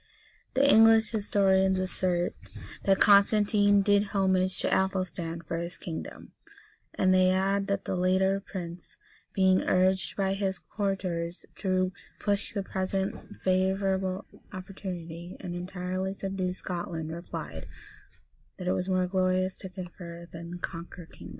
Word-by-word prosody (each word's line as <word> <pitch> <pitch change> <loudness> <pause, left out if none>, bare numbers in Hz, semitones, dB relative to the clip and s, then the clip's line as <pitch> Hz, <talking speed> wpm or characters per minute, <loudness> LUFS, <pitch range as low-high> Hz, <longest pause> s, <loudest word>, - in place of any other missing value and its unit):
The 275 +2 +4
English 225 -3 +6
historians 190 -3 +3
assert,[] 185 -1 0 0.5
that 195 -1 +4
Constantine 205 0 +5
did 205 0 +2
homage 190 -1 +2
to - - 0
Athelstan 180 -3 -1
for 165 +1 -4
his 170 +1 -5
kingdom; 160 -2 -7 0.6
and 185 0 +3
they 185 0 +5
add, 195 +1 +1
that 200 -1 -1
the - - -1
latter 190 +2 +2
prince, 175 -3 -8 0.4
being 190 -1 +4
urged 185 +1 +1
by 195 -1 +1
his 195 -1 -1
courtiers 180 -4 -3
to 185 -1 +1 0.3
push 205 0 -1
the 200 -3 -2
present 190 +1 -1 0.3
favorable 190 0 +1 0.3
opportunity, 180 -3 -7
and 175 - -5
entirely 185 +1 -3
subdue 190 -2 -2
Scotland, 170 -3 -4
replied, 170 +2 -6 0.9
that 180 - -6
it 185 - +3
was 185 +1 -2
more 185 -1 +2
glorious 185 0 +1
to 190 - -7
confer 175 -2 -8
than 170 +1 -8
conquer 170 0 -7
kingdoms. - - -12
185 Hz, 130 wpm, -28 LUFS, 180-195 Hz, 0.9 s, English